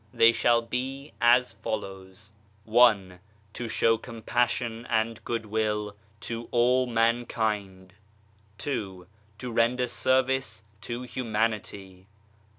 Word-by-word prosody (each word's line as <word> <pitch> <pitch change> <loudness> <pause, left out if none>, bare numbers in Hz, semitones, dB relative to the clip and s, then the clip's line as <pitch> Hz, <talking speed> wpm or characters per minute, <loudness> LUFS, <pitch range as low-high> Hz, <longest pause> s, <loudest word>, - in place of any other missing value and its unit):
They 115 +2 +6
shall 115 0 +2
be 135 +4 -4
as 120 +1 +4
follows: 100 -2 -6 0.4
i 105 -6 +4 0.3
To 120 - -5
show 115 0 +2
compassion 120 0 -2
and 110 0 0
goodwill 105 -2 -2 0.3
to 115 0 -5
all 125 +1 +3
mankind. 110 -5 -1 0.6
2. 95 -10 -4 0.3
To 125 0 -6
render 120 +2 +2
service 130 -3 0 0.2
to 120 +1 -5
humanity. 105 -6 -3
115 Hz, 95 wpm, -27 LUFS, 105-120 Hz, 0.6 s, They